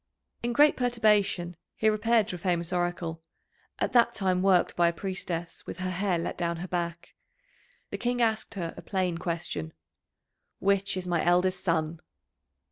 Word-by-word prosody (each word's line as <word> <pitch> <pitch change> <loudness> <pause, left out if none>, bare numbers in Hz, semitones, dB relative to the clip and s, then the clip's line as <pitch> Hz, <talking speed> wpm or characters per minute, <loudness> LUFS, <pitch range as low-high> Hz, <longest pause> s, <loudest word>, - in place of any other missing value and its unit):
In 240 - -1
great 295 +5 +5
perturbation 210 -7 +2 0.2
he 220 - +1
repaired 215 0 +3
to 180 - -3
a - - -8
famous 170 -1 -1
Oracle, 175 -2 -2 0.6
at - - -1
that 240 -1 +4
time 185 -2 +1
worked 190 -2 +3
by 175 -1 +4
a 170 - +1
priestess 175 -2 -4
with - - -6
her 185 0 -2
hair 185 0 0
let 170 - -4
down 170 -1 -1
her 180 +2 -5
back. 170 -1 -4 0.8
The - - -4
King 245 0 0
asked 225 -1 0
her 170 -4 -3
a - - -9
plain 185 -3 -1
question: 165 - -3 0.8
"Which 195 0 +1
is 185 - -3
my 175 -2 0
eldest 180 +2 +2
son?" 160 -2 0
180 Hz, 165 wpm, -28 LUFS, 170-205 Hz, 0.8 s, great